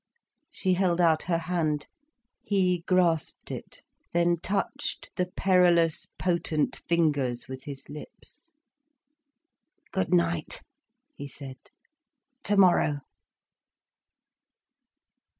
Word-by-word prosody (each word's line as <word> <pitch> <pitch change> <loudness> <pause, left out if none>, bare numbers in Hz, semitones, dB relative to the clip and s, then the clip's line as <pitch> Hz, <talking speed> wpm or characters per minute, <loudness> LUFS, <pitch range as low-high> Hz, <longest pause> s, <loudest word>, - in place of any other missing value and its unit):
She 185 -2 0
held 180 -1 +1
out 165 -3 +4
her 170 - +3
hand. 160 -3 -1 0.6
He 185 -3 +1
grasped 175 -4 +1
it, - - -8 0.3
then 170 0 +3
touched 195 +4 -3
the 180 - 0
perilous, 180 -3 +3
potent 170 -4 0
fingers 145 -8 +1
with 130 0 -8
his 140 -2 -8
lips. 225 - -11 1.4
"Good 190 -1 -1
night," 170 -3 0 0.5
he 145 - -8
said. 135 -1 -9 0.8
"Tomorrow." 185 - +3
170 Hz, 85 wpm, -27 LUFS, 150-180 Hz, 1.4 s, out